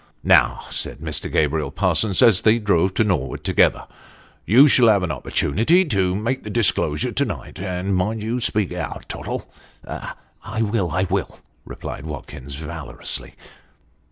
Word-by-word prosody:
"Now," -, -, +4 dB
said -, -, -2 dB
Mr. 80 Hz, 0 st, -4 dB
Gabriel 75 Hz, -1 st, +1 dB
Parsons, 95 Hz, +4 st, +2 dB
as 110 Hz, -5 st, +5 dB
they 110 Hz, +1 st, +4 dB
drove 95 Hz, -4 st, +1 dB
to -, -, +3 dB
Norwood 85 Hz, -11 st, -2 dB
together -, -, +2 dB, 0.3 s
" -, -, -29 dB
you 135 Hz, +6 st, +8 dB
shall 125 Hz, -4 st, +5 dB
have 100 Hz, -4 st, +4 dB
an 90 Hz, -, -1 dB
opportunity 135 Hz, -, +1 dB
to 95 Hz, -, 0 dB
make 115 Hz, +6 st, -2 dB
the 105 Hz, -, -8 dB
disclosure 95 Hz, -8 st, +1 dB
to -, -, +1 dB
night, -, -, -6 dB
and 95 Hz, +1 st, -2 dB
mind 105 Hz, +4 st, -1 dB
you 115 Hz, +3 st, -2 dB
speak 105 Hz, -6 st, -1 dB
out, 85 Hz, -5 st, -5 dB
Tottle." -, -, -5 dB, 0.4 s
"I 110 Hz, +2 st, -6 dB
will 100 Hz, -4 st, 0 dB
I 90 Hz, +4 st, 0 dB
will! 95 Hz, -, -2 dB
" -, -, -40 dB
replied 70 Hz, -, -7 dB
Watkins, 70 Hz, -1 st, -8 dB
valorously. 75 Hz, 0 st, -5 dB
95 Hz, 155 wpm, -21 LUFS, 80-110 Hz, 0.4 s, you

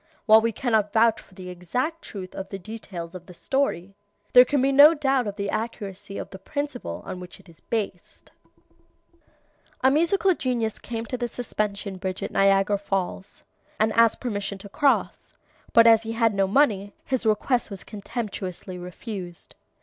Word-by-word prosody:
While 220 Hz, 0 st, +7 dB
we 230 Hz, +1 st, +1 dB
cannot 220 Hz, -3 st, 0 dB
vouch 225 Hz, 0 st, +4 dB
for 190 Hz, -, -22 dB
the 185 Hz, -1 st, -8 dB
exact 250 Hz, -, -3 dB
truth 185 Hz, -3 st, -8 dB
of 190 Hz, -, -6 dB
the 195 Hz, -, -5 dB
details 185 Hz, -4 st, -8 dB
of 180 Hz, -1 st, -10 dB
the 180 Hz, -, -12 dB
story, 200 Hz, -7 st, -1 dB, 0.4 s
there 250 Hz, 0 st, +9 dB
can 285 Hz, +2 st, +1 dB
be 270 Hz, +2 st, +3 dB
no 290 Hz, +4 st, +8 dB
doubt 270 Hz, -5 st, +1 dB
of 200 Hz, -, -4 dB
the 200 Hz, -1 st, -3 dB
accuracy 200 Hz, -3 st, -5 dB
of -, -, -6 dB
the 190 Hz, -, -9 dB
principle 285 Hz, +4 st, -5 dB
on 185 Hz, -, -6 dB
which 180 Hz, -1 st, -10 dB
it -, -, -20 dB
is 165 Hz, -2 st, -17 dB
based: 205 Hz, -5 st, -5 dB, 1.5 s
"A 260 Hz, -, +5 dB
musical 340 Hz, +6 st, +3 dB
genius 240 Hz, -7 st, -2 dB
came 230 Hz, -1 st, -5 dB
to 250 Hz, -, -4 dB
the 240 Hz, 0 st, -2 dB
Suspension 210 Hz, -5 st, -3 dB
Bridge 185 Hz, 0 st, -4 dB
at -, -, -4 dB
Niagara 195 Hz, 0 st, +3 dB
Falls, 195 Hz, 0 st, -4 dB, 0.4 s
and 215 Hz, 0 st, +2 dB
asked 230 Hz, 0 st, +4 dB
permission 205 Hz, -5 st, -3 dB
to 200 Hz, +1 st, -11 dB
cross; 285 Hz, +6 st, 0 dB, 0.4 s
but 230 Hz, -, +7 dB
as 225 Hz, -1 st, +7 dB
he 225 Hz, 0 st, -5 dB
had 225 Hz, -1 st, +2 dB
no 195 Hz, -1 st, +2 dB
money, 205 Hz, -4 st, +2 dB
his 260 Hz, -4 st, -1 dB
request 230 Hz, +3 st, +1 dB
was 195 Hz, -2 st, -7 dB
contemptuously 200 Hz, -4 st, -6 dB
refused. 180 Hz, 0 st, -8 dB
215 Hz, 175 wpm, -25 LUFS, 195-245 Hz, 1.5 s, there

